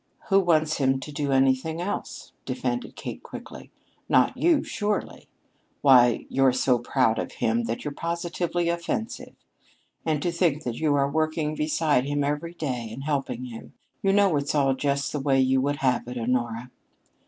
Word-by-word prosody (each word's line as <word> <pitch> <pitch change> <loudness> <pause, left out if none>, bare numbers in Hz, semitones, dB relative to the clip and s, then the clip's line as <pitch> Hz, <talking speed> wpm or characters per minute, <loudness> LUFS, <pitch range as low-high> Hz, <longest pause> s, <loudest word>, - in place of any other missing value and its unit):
"Who 195 -1 +6
wants 155 -4 +2
him 135 -1 +2
to 140 +3 -8
do 145 -1 -2
anything 135 +4 +2
else!" 185 +4 -5
defended - - -3
Kate - - -7
quickly. - - -10 0.4
"Not - - +4
you, 335 -4 +3
surely! 210 -1 -3 0.5
Why, 125 -3 +5
you're 135 -1 +3
so 125 -1 +2
proud 120 -2 +1
of - - -4
him 115 +1 0
that 115 +4 -4
you're 145 - -3
positively 170 +1 -2
offensive! 170 +6 -3 0.7
And 155 -2 0
to 175 - +1
think 165 -3 +1
that 120 -2 -4
you 150 -2 +2
are 140 -1 +2
working 155 +1 -1
beside 150 -3 +1
him 145 0 0
every 150 +4 -2
day, 125 -8 -3
and 130 +5 -7
helping 135 -4 -2
him 115 -2 -10 0.3
you 195 - +2
know 200 -4 +4
it's 140 +1 -1
all 135 -2 +3
just 140 +1 -1
the 150 - -2
way 135 -1 +2
you 130 0 +3
would 145 +2 0
have 125 -2 +1
it, 125 0 -5
Honora." 120 0 -2
145 Hz, 170 wpm, -25 LUFS, 130-160 Hz, 0.7 s, Who